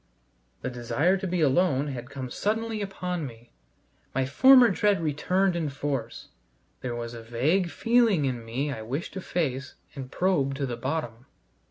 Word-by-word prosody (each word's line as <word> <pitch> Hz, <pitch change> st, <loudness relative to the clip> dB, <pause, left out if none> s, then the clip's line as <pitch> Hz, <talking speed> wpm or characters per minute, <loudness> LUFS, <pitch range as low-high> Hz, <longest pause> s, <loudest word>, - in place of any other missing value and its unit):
The 130 Hz, -, -2 dB
desire 125 Hz, +9 st, +1 dB
to 190 Hz, 0 st, -4 dB
be 180 Hz, -1 st, -1 dB
alone 145 Hz, -1 st, +2 dB
had 125 Hz, -1 st, -6 dB
come 130 Hz, -3 st, -6 dB
suddenly 220 Hz, +1 st, -1 dB
upon 180 Hz, -3 st, -3 dB
me; 115 Hz, -1 st, -14 dB, 0.6 s
my 135 Hz, 0 st, +2 dB
former 250 Hz, -, +7 dB
dread 200 Hz, +1 st, +2 dB
returned 175 Hz, +4 st, +1 dB
in 165 Hz, -3 st, -1 dB
force; 135 Hz, -4 st, -4 dB, 0.5 s
there 120 Hz, -2 st, -3 dB
was 120 Hz, 0 st, -5 dB
a 115 Hz, -, -8 dB
vague 140 Hz, +11 st, +1 dB
feeling 230 Hz, -, +3 dB
in 125 Hz, -3 st, -2 dB
me 130 Hz, +6 st, -2 dB
I 110 Hz, -, -6 dB
wished 130 Hz, +9 st, -4 dB
to 190 Hz, -, -5 dB
face 140 Hz, -7 st, -2 dB, 0.2 s
and 135 Hz, -2 st, -7 dB
probe 140 Hz, -6 st, +1 dB
to 140 Hz, 0 st, -2 dB
the 125 Hz, -2 st, -3 dB
bottom. 130 Hz, -3 st, -4 dB
145 Hz, 165 wpm, -27 LUFS, 125-185 Hz, 0.6 s, former